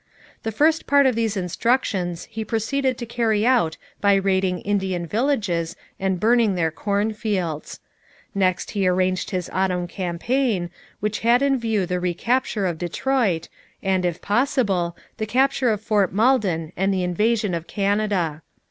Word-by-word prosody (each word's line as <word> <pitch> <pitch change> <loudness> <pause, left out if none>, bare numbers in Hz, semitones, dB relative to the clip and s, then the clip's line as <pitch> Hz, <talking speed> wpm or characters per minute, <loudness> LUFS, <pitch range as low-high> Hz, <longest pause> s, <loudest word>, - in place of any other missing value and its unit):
The 225 - -3
first 310 +8 +2
part 285 0 +5
of 260 - +4
these 225 -2 -1
instructions 185 -2 0
he 220 - -5
proceeded 250 +4 -1
to 240 - -5
carry 225 -2 +1
out 230 -11 +2 0.2
by 200 -1 +4
raiding 190 -2 +1
Indian 190 -4 -1
villages 205 - 0 0.2
and 190 -2 0
burning 225 -1 +3
their 165 -2 +1
cornfields. 200 -4 -2 0.5
Next 185 -2 0
he 195 -2 0
arranged 185 0 +1
his 180 -3 -2
autumn 180 -2 0
campaign, 185 +2 -1 0.3
which 210 0 -1
had 240 +3 +3
in 275 -2 +2
view 220 -5 0
the 180 0 -2
recapture 205 +5 0
of 170 -3 -2
Detroit 190 0 0 0.4
and, 190 -1 +1
if 175 -1 -2
possible, 205 -7 +1 0.2
the 215 -1 -3
capture 260 +2 +2
of 210 -2 0
Fort 210 -4 +1
Malden 195 -8 +1
and 195 +2 +1
the 190 -2 0
invasion 210 +3 +1
of 170 -1 -3
Canada. 200 -6 0
200 Hz, 150 wpm, -23 LUFS, 180-230 Hz, 0.5 s, part